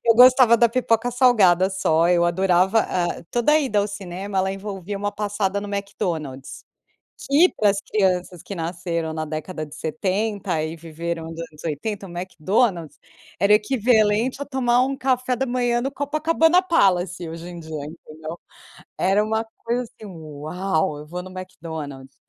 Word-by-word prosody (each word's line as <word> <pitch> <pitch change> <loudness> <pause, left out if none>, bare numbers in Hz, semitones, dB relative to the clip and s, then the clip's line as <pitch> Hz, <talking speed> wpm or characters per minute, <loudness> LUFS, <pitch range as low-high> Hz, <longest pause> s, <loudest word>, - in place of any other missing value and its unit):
Eu 230 -1 +5
gostava 250 -1 +7
da 235 0 +4
pipoca 230 -1 +1
salgada 205 -7 +4
só. 165 -3 +2
Eu 175 -1 +4
adorava 185 +4 +3
ah, 175 -2 -2
toda 240 +5 +2
a 310 - +5
ida 235 -8 0
ao 205 - +1
cinema 195 0 -5
ela 190 0 +1
envolvia 195 0 -6
uma 205 0 -2
passada 205 -1 -1
no 205 - -6
McDonald's. 165 -9 -4 0.7
Que 325 +6 +5
para 210 -2 +4
as 195 - -1
crianças 185 -5 -1
que 200 - -7
nasceram 170 -1 -3
na 155 0 -3
década 155 +1 -5
de 150 0 -12
70 190 +4 -1
e 160 +1 -4
viveram 165 +1 -5
nos 165 - -9
anos 155 -2 -10
80, 195 +6 -3
o - - -11
McDonald's 180 - -1 0.4
era 200 +3 +4
equivalente 225 +2 +2
a - - -2
tomar 250 -3 +2
um 270 0 -2
café 255 -1 0
da 265 +2 -1
manhã 245 -1 +1
no 270 +3 -3
Copacabana 320 +4 +2
Palace 180 - +1
hoje 165 +2 -8
em 175 -1 -8
dia, 155 -3 -6
entendeu? 155 +1 -9 0.6
Era 195 +3 +3
uma 220 +1 -1 0.2
coisa 240 +2 0
assim: 220 -2 -13
"Uau, 155 -1 -3
eu 150 - -9
vou 180 +3 -6
no 185 - -10
McDonald's". 155 -7 -8
195 Hz, 165 wpm, -23 LUFS, 170-230 Hz, 0.7 s, gostava